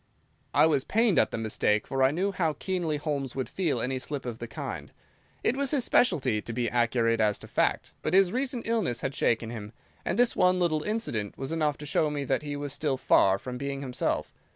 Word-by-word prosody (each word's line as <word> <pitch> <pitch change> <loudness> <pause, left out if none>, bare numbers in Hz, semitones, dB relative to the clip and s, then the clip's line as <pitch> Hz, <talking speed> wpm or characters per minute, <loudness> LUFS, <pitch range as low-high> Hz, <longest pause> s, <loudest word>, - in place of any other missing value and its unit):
I - - +7
was 145 -4 +2
pained 225 +1 +3
at - - +3
the - - -4
mistake, 105 -1 0
for 135 -1 -2
I 130 - +6
knew 185 +7 0
how 165 -5 0
keenly 170 -1 -2
Holmes 145 -3 -3
would 130 -1 -2
feel 165 -10 -1
any 130 +2 -1
slip 140 +1 -4
of 120 -2 -5
the 120 - -5
kind. 115 - -6 0.5
It 245 - +2
was 280 0 0
his 275 -3 +2
specialty 130 - +2
to 115 - -6
be 120 0 0
accurate 115 -1 +2
as 105 -1 +2
to - - -11
fact, - - 0
but - - 0
his 190 -2 +5
recent 255 0 -2
illness 215 - 0
had 135 - -2
shaken 115 -3 0
him, 110 -2 -7 0.3
and - - -1
this 245 0 +3
one 180 0 +4
little 165 -4 +1
incident 150 - -2
was 135 +2 -4
enough 155 -3 0
to 150 - -8
show 150 +1 +1
me 145 -1 -3
that 135 0 0
he 145 -1 -4
was 145 -1 -4
still 145 -2 -1
far 95 -6 +4
from 125 +4 -7
being 140 0 -3
himself. 130 -3 -2
140 Hz, 225 wpm, -28 LUFS, 120-175 Hz, 0.5 s, I